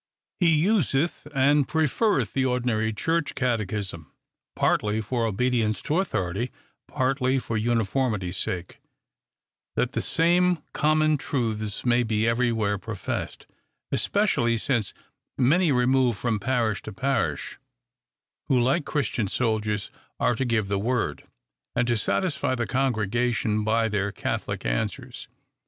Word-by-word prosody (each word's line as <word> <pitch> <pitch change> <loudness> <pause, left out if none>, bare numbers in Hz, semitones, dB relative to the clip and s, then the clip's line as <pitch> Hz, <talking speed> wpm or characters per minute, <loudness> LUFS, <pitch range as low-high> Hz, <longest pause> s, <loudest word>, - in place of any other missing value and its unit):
He 175 -3 +4
useth 165 -3 +1
and 140 0 +3
preferreth 160 - +1
the 135 - +1
ordinary 120 -4 0
church 160 +8 -1
cate 125 -3 +1
chism; 95 -6 -4 0.5
partly 105 +1 +1
for 115 +1 -1
obedience 115 0 0
to 155 +4 +1
authority, 100 - -1 0.4
partly 130 0 +1
for 115 -3 -3
uniformity 110 -3 0
sake, 90 -1 -4 0.9
that - - 0
the - - -1
same 175 +2 +3 0.2
common 155 0 +3
truths 110 -7 -2
may 120 0 +4
be 110 -1 0
every 120 +1 +2
where 105 -3 0
professed; 110 -2 -5 0.5
especially 120 - +2
since 115 -3 -1 0.4
many 155 +6 +3
remove 125 -2 +3
from 115 -1 -1
parish 115 -2 0
to - - -8
parish, 95 - -2 0.9
who 130 - +3
like 135 +6 +2
Christian 120 -7 -1
soldiers 105 -2 -1 0.3
are - - +3
to 130 +3 -1
give 115 -4 +1
the 100 0 0
word, 115 -9 -1 0.5
and 120 0 +1
to 120 - +2
satisfy 140 - 0
the 120 -1 -1
congregation 115 -3 0
by 115 +1 +2
their 100 -2 -1
catholic - - -3
answers. - - -3
120 Hz, 125 wpm, -25 LUFS, 110-135 Hz, 0.9 s, He